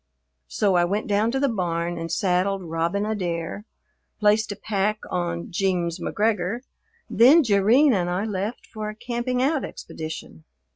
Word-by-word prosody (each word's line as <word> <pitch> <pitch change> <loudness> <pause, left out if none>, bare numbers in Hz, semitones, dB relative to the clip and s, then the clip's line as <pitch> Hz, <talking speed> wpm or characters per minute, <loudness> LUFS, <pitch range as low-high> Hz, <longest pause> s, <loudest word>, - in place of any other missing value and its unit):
So 200 - +1
I 175 - +4
went 200 +5 -1
down 210 +2 +1
to 265 +3 -1
the 280 - +2
barn 175 -6 -2
and 165 0 -5
saddled 190 0 +1
Robin 170 +4 -1
Adair, 180 -2 -3 0.5
placed 210 0 +3
a - - -4
pack 210 +1 -1
on 170 -1 -2
"Jeems 175 -2 0
McGregor," 210 +1 0 0.5
then 280 +8 +6
Jerrine 230 +6 +4
and 175 -4 0
I 180 +4 -1
left 210 +2 -3
for 215 -1 -6
a 215 - -7
camping 245 +2 -2
out 290 +1 +1
expedition. 155 - -8
200 Hz, 150 wpm, -24 LUFS, 175-220 Hz, 0.5 s, then